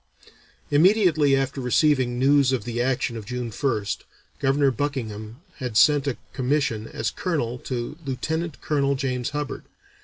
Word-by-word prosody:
Immediately 160 -3 +4
after 135 0 -1
receiving 125 -1 +2
news 135 +1 +4
of 130 -5 0
the 120 +1 -2
action 125 -1 0
of 110 -3 -7
June 125 -1 -4
1st, 110 -4 -1 0.4
Governor 135 +1 +3
Buckingham 120 -3 -4 0.2
had 125 -6 -3
sent 145 +1 +5
a 135 - -1 0.2
commission 130 -4 0
as 110 -1 -3
colonel 125 -9 -2
to 125 +5 -5
Lieutenant 160 +4 -3
Colonel 140 -2 +1
James 130 -2 -2
Hubbard. 150 -1 -4
135 Hz, 140 wpm, -24 LUFS, 120-145 Hz, 0.4 s, sent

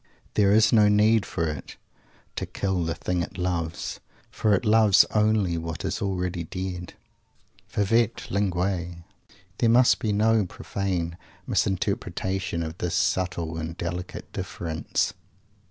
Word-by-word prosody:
There 100 -2 +4
is 110 +3 +5
no 105 -2 +6
need 105 +1 +4
for 85 - -1
it 75 -3 -6 0.6
"to - - -3
kill 95 -3 -1
the 80 - -2
thing 90 -1 -1
it 85 - -6
loves," 85 -2 -2 0.3
for 105 -2 +2
it 95 - -2
loves 105 -3 +6
only 105 -5 +2
what 80 -1 -5
is - - -2
already 90 -3 -2
dead. 90 +1 -5 0.8
Favete 115 +2 +1
linguis! 90 -3 -1 0.6
There 115 - +3
must 120 +2 +5
be 110 - -1
no 110 -1 +3
profane 90 -3 -3 0.3
misinterpretation 95 -2 -1
of 80 +2 -6
this 90 0 -1
subtle 90 -4 0
and 80 +1 -5
delicate 90 +1 -5
difference. 80 -2 -2
95 Hz, 130 wpm, -26 LUFS, 85-105 Hz, 0.8 s, no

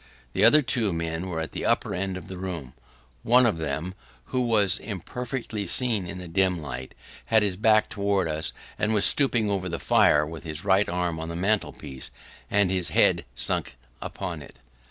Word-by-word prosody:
The - - +1
other 150 0 +7
two 115 -5 0
men 85 +1 -3
were 80 -2 -3
at 80 - -4
the - - -5
upper - - +1
end 95 0 -2
of - - -10
the 95 -1 -8
room. 85 -9 -6 0.5
One 125 - +5
of 105 -8 +1
them, 80 +4 -3 0.4
who 130 - +2
was 105 -7 +2
imperfectly 110 +2 -5
seen 115 -8 +1
in 95 - -7
the 90 -1 -8
dim 90 +1 +1
light, 65 -4 -7 0.3
had 110 -1 +4
his 100 -3 0
back 110 +2 +3
towards 100 -4 0
us, 80 -1 -2 0.3
and 110 +1 +1
was 105 - +5
stooping 120 -7 +3
over 95 -2 -2
the 85 - -3
fire, 75 -1 +4
with 80 +1 -8
his 80 +2 -6
right 100 +1 +3
arm 90 -2 -2
on 80 0 -5
the 85 - -5
mantel 95 -3 0
piece, 65 -1 -9 0.4
and 100 -2 +2
his 90 -3 +1
head - - +3
sunk - - 0 0.3
upon 90 -5 -5
it. - - -13
95 Hz, 195 wpm, -26 LUFS, 80-105 Hz, 0.5 s, other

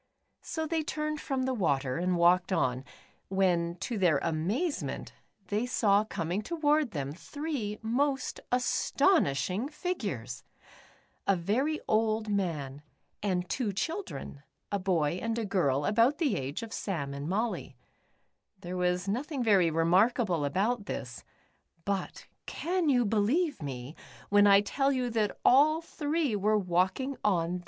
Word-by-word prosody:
So 320 -1 -3
they 320 0 0
turned 305 0 -3
from 270 -2 -2
the 260 0 0
water, 140 - 0
and 180 +1 0
walked 175 +2 +4
on,, 130 -8 +1 0.4
when 175 -3 +1
to 220 +2 -3
their 175 -6 +4
amazement, 195 - -2 0.4
they 215 +4 0
saw 210 -4 +3
coming 180 -1 -2
toward, 305 0 +1
them, 140 -7 -4
three 265 - -4
most 270 +4 0
astonishing 245 - +2
figures! 200 - -4 0.8
A 195 - +4
very 245 - 0
old 220 0 +1
man, 155 -9 -2 0.4
and 180 -3 -1
two 235 -1 -1
children, 320 - -4 0.3
a 200 - 0
boy 175 -3 0
and 230 0 -2
a 230 - -1
girl 145 -8 +1
about 230 - +3
the 295 -4 +1
age 140 - -4
of 225 - -7
Sam 145 -9 -3
and 140 +3 -5
Molly. 220 +5 -2 0.8
There 180 +1 -5
was 180 +1 0
nothing 260 +6 -2
very 195 -7 +4
remarkable 175 - +2
about 205 +8 0
this, 120 -2 -6 0.6
but 200 -2 -3 0.2
can 350 -1 -1
you 245 -3 +3
believe 230 - +1
me,, 135 0 -6 0.4
w^hen 205 0 +6
I 200 0 +7
tell 275 +6 0
you 250 -3 -1
that 215 -3 0
all 300 +5 +6
three 305 -5 -1
were 210 +2 +2
walking 190 +9 0
on. 180 -3 +1
205 Hz, 135 wpm, -30 LUFS, 175-260 Hz, 0.8 s, I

